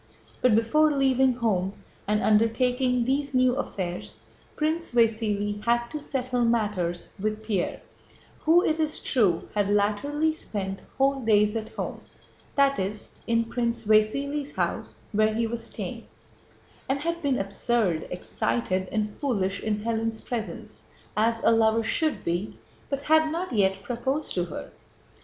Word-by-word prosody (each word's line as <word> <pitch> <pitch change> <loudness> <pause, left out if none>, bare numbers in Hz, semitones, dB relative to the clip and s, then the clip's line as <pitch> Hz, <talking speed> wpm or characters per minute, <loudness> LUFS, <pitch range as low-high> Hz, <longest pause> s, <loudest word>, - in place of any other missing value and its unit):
But 250 -4 +5
before 305 +8 +4
leaving 265 -2 +3
home 200 -6 0 0.3
and 210 +1 +1
undertaking 245 +3 +2
these 275 +1 0
new 255 0 +4
affairs, 185 -9 -4 0.3
Prince 315 -2 -1
Vasíli 210 -3 +1
had 235 0 +1
to 300 +4 -5
settle 255 -4 -1
matters 210 -7 0
with 215 +2 -2
Pierre, 210 -5 -1 0.6
who, 335 +3 +5
it 315 +1 +1
is 310 -1 -1
true, 200 - +2
had 205 -1 +1
latterly 280 +10 +1
spent 195 -9 -4 0.2
whole 270 +1 +3
days 210 -1 +3
at 220 -1 -3
home, - - -4 0.5
that 275 0 +3
is, 200 +2 -4
in 230 0 +3
Prince 235 0 -2
Vasíli's 275 +7 +2
house - - -2 0.2
where 215 0 +2
he 230 +1 +1
was 230 +1 -4
staying, - - -6 0.8
and 275 +1 0
had 335 +2 -2
been 280 -4 +1
absurd, 195 -3 0
excited, 185 +1 -1
and 210 -1 -1
foolish 200 -8 0
in 210 -1 -1
Hélène's 225 -1 -1
presence 230 -3 -6 0.3
(as 225 +1 +1
a - - +5
lover 225 0 +3
should 310 +7 0
be), 175 +5 -2 0.3
but 275 0 -2
had 315 0 +4
not 340 -2 -3
yet 195 -2 +2
proposed 265 +7 -2
to 175 -1 0
her. 170 - -7
230 Hz, 145 wpm, -26 LUFS, 210-270 Hz, 0.8 s, But